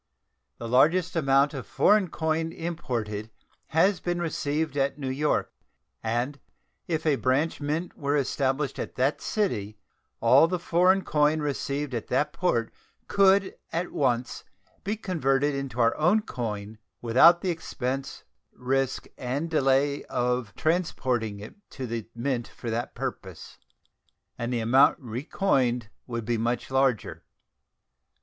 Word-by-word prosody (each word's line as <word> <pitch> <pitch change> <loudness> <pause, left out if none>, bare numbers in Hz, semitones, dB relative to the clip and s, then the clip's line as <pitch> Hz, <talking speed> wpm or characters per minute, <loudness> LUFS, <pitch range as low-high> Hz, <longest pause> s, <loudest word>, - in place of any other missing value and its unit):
The 115 - -6
largest 165 +10 +3
amount 140 -2 +3
of 130 -7 -6
foreign 210 -2 +3
coin 160 0 -1
imported 120 -11 -4 0.4
has 180 +5 +3
been 175 0 -2
received 155 -2 -2
at 140 0 0
New 135 -3 -3
York, 150 +3 0 0.5
and 120 +6 -2 0.5
if 160 -2 -2
a 150 -3 +3
branch 140 +6 0
mint 155 +5 -2
were 145 0 0
established 135 +1 -1
at - - -5
that 135 +3 +1
city 110 - -2 0.4
all 165 - +6
the 180 +1 -1
foreign 180 +3 +3
coin 150 +1 +2
received 145 -1 -2
at 115 -3 -3
that 150 +4 0
port 120 - 0 0.3
could 195 0 +4 0.2
at 170 +2 -2
once 125 -3 -1 0.4
be 205 +3 -1
converted 145 - +1
into 135 -3 -4
our 115 0 +3
own 180 +8 +3
coin 110 - -5 0.2
without 160 +9 +6
the 185 - 0
expense, 135 -4 -4 0.3
risk, 135 +1 -1
and 140 +6 -3
delay 140 -1 +2
of 125 -3 -1
transporting 130 - -1
it 105 - -9 0.2
to 130 - -6
the 115 -2 -4
Mint 120 0 -2
for 115 - -7
that 115 +2 -3
purpose, - - -6 0.8
and 120 +1 -4
the 120 -2 0
amount 130 +5 +5
recoined 125 - 0 0.2
would 115 -2 -4
be 120 0 0
much 120 +3 -2
larger. 130 -4 0
135 Hz, 135 wpm, -27 LUFS, 120-160 Hz, 0.8 s, all